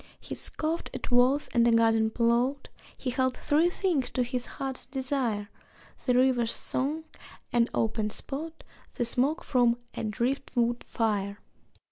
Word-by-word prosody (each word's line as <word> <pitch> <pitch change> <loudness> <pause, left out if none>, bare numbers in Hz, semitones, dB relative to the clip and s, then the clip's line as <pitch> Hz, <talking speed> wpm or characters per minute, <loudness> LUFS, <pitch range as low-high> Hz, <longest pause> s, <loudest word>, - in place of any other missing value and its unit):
He - - -7
scoffed 320 +2 -2
at - - -5
walls 255 +4 +4
and 235 -1 +3
a - - +5
garden 225 -1 +4
plot; 240 +4 +1 0.3
He 255 - -2
held 260 0 0
three 310 +4 +3
things 350 -8 0
to 250 - 0
his 245 0 -3
heart's 265 -2 -5
desire: 255 -6 -1 0.6
The 250 - +4
river's 250 -2 +3
song, 295 +5 -2 0.5
an 240 -1 +4
open 220 -1 0
spot, 315 +8 -6 0.3
The 240 - 0
smoke 260 +7 +1
from 240 -3 +3 0.2
a - - -4
driftwood 240 +1 0
fire. 205 -3 -1
250 Hz, 140 wpm, -28 LUFS, 235-275 Hz, 0.6 s, a